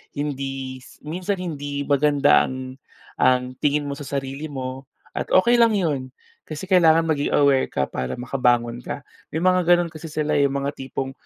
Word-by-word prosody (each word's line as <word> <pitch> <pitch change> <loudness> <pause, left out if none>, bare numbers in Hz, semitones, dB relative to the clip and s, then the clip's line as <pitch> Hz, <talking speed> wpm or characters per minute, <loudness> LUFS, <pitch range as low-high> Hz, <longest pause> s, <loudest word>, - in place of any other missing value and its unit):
hindi 135 -2 -4 0.2
minsan 180 +6 -2
hindi 145 -6 -4
maganda 145 0 +4
ang, 130 0 -7 0.4
ang 125 0 +2
tingin 145 0 +1
mo 145 - -4
sa 140 0 -7
sarili 135 +2 -4
mo, 130 -2 -6 0.2
at - - -4
okey 235 +6 +5
lang 230 -2 +5
'yon, 140 -9 -2 0.3
kasi 155 +1 -6
kailangan 170 -4 +5
maging 155 -3 0
aware 140 -2 +4
ka 70 - -1
para 65 -1 -4
makabangon 120 -2 0
ka. 140 +3 -6 0.3
May 160 - -1
mga 185 -1 +3
gano'n 175 -1 +4
kasi 160 0 -9
sila 155 -1 0
eh, 140 - +4
'yong 140 - -4
mga 140 - -1
tipong, 135 0 -4
140 Hz, 170 wpm, -23 LUFS, 130-160 Hz, 0.4 s, okey